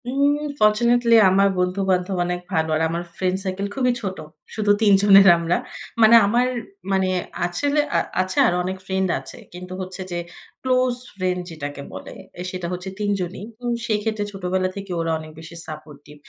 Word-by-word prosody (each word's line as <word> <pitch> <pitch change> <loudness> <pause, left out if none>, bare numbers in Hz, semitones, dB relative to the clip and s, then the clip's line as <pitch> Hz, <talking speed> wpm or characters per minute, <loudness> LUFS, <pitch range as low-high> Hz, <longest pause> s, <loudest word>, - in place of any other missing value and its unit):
উউম 280 +2 +2 0.2
fortunately 235 +2 +4
আমার 195 +1 +4
বন্ধু-বান্ধব 185 0 0
অনেক 180 0 -3
ভালো। 160 -2 +1
আর 155 - 0
আমার 170 +1 -3
ফ্রেন্ড 185 0 0
সার্কেল 195 +1 -3
খুবই 250 -2 +2
ছোট। 190 -3 -4 0.4
শুধু 210 -2 +2
৩ 205 -2 +5
জনের 195 -1 +7
আমরা। 170 +1 0 0.4
মানে 220 +1 +8
আমার 240 +5 +2 0.5
মানে 190 -1 +2 0.4
আসলে 285 +13 0 0.2
আ - - +4 0.2
আছে 185 0 -4
আরো 175 - +1
অনেক 185 +1 -3
ফ্রেন্ড 190 0 0
আছে। 135 - -10 0.2
কিন্তু 180 +1 -8
হচ্ছে 185 +1 -6
যে, 175 - -2 0.4
ক্লোজ 255 -1 +2 0.2
ফ্রেন্ড 185 -1 -1
যেটাকে 145 -3 -6
বলে, - - -8 0.4
সেটা 180 -2 -4
হচ্ছে 180 +1 -5
৩ 205 -1 -1
জনই। 180 +2 -5 0.2
উম 240 0 0
সেই 220 -3 +1
ক্ষেত্রে 215 -1 -1
ছোটবেলা 185 -1 -1
থেকে 200 -1 -7
ওরা 165 0 -1
অনেক 155 0 -10
বেশি 165 +1 -11
সাপোর্টিভ। 150 -1 -11
190 Hz, 170 wpm, -22 LUFS, 180-210 Hz, 0.5 s, মানে